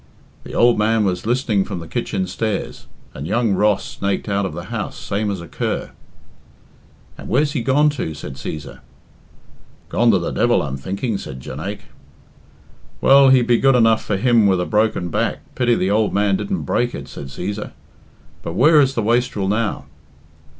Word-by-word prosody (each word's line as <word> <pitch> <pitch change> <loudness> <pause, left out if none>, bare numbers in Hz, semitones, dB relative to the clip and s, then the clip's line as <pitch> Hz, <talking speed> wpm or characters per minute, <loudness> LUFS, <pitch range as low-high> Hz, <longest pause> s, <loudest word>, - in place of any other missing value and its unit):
"The - - -7
ould 120 -2 +4
man 110 0 +2
was 90 +1 -2
listening 120 -5 +1
from 95 -1 -6
the 85 -1 -8
kitchen 95 +4 -2
stairs, 95 -9 -4 0.3
and 70 +4 -6
young 115 -2 +1
Ross 105 +1 +2
snaked 100 +2 -3
out 100 -1 0
of - - -7
the - - -6
house - - -4
same 105 +1 -2
as 100 -2 -3
a 85 - -9
cur." - - -3 1.3
"And - - -9
where's 145 +5 +2
he 140 - -2
gone 145 +5 +3
to?" 80 - -4
said 75 -1 -7
Cæsar. 70 +2 -7 1.1
"Gone 120 +1 +2
to 105 - +5
the 85 - -3
devil, - - +2
I'm 70 -2 -4
thinking," 100 - -3
said 65 - -8
Jonaique. 80 +11 -6 1.1
"Well, 135 0 +6
he'd 130 -2 +5
be 120 -1 +3
good 135 -1 +4
enough 115 -2 +3
for 100 - -1
him 115 0 +4
with 95 -2 +2
a 90 - -1
broken 105 -4 0
back - - -1
pity 120 -1 +2
the 95 -1 0
ould 105 0 +1
man 100 -1 +2
didn't 190 - -3
break 120 0 0
it," - - -7
said 70 - -8
Cæsar. 100 +9 -5 0.7
"But 85 - -5
where 150 - +5
is 135 -1 +1
the 115 - 0
wastrel 115 -3 0
now?" 105 +1 -1
105 Hz, 180 wpm, -20 LUFS, 95-120 Hz, 1.3 s, Well